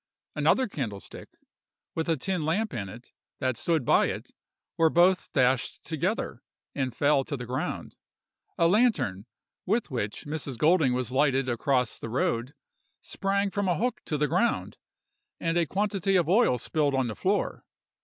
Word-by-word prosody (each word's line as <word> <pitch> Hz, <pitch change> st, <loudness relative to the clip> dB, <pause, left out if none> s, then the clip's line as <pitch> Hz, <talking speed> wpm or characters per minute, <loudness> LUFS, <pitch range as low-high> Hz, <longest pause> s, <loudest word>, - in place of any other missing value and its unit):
Another 260 Hz, -, +3 dB
candlestick, 115 Hz, -, -6 dB, 0.6 s
with 160 Hz, +1 st, -2 dB
a 165 Hz, -, +2 dB
tin 180 Hz, +3 st, -2 dB
lamp 195 Hz, +7 st, 0 dB
in 100 Hz, -5 st, -4 dB
it, 115 Hz, +5 st, -12 dB, 0.3 s
that 130 Hz, -2 st, 0 dB
stood 160 Hz, +2 st, 0 dB
by -, -, +4 dB
it, -, -, -5 dB, 0.4 s
were 165 Hz, -1 st, +4 dB
both 180 Hz, +3 st, +3 dB
dashed 130 Hz, -1 st, +1 dB
together, 175 Hz, -, -2 dB, 0.3 s
and 130 Hz, -4 st, -2 dB
fell 145 Hz, 0 st, +3 dB
to 140 Hz, 0 st, -4 dB
the 125 Hz, -, -6 dB
ground. 125 Hz, +2 st, -4 dB, 0.6 s
A 170 Hz, -, +4 dB
lantern, 175 Hz, -, +2 dB, 0.4 s
with 215 Hz, -3 st, 0 dB
which 105 Hz, -5 st, -3 dB
Mrs. 145 Hz, -4 st, -4 dB
Golding 155 Hz, -3 st, +4 dB
was 125 Hz, -1 st, -2 dB
lighted 135 Hz, -1 st, +2 dB
across 125 Hz, 0 st, 0 dB
the 115 Hz, -, -6 dB
road, 120 Hz, +3 st, -1 dB, 0.5 s
sprang 200 Hz, 0 st, -1 dB
from 200 Hz, 0 st, -1 dB
a 175 Hz, -, +2 dB
hook 245 Hz, +2 st, -1 dB
to 150 Hz, -, -1 dB
the 150 Hz, +1 st, +1 dB
ground, 185 Hz, +9 st, 0 dB, 0.6 s
and 165 Hz, 0 st, -1 dB
a 170 Hz, -2 st, +2 dB
quantity 195 Hz, 0 st, 0 dB
of 175 Hz, -4 st, +3 dB
oil 190 Hz, -, +4 dB
spilled 145 Hz, +3 st, 0 dB
on 130 Hz, -1 st, +1 dB
the 110 Hz, -, -4 dB
floor. 200 Hz, +2 st, -1 dB
150 Hz, 160 wpm, -27 LUFS, 125-185 Hz, 0.6 s, by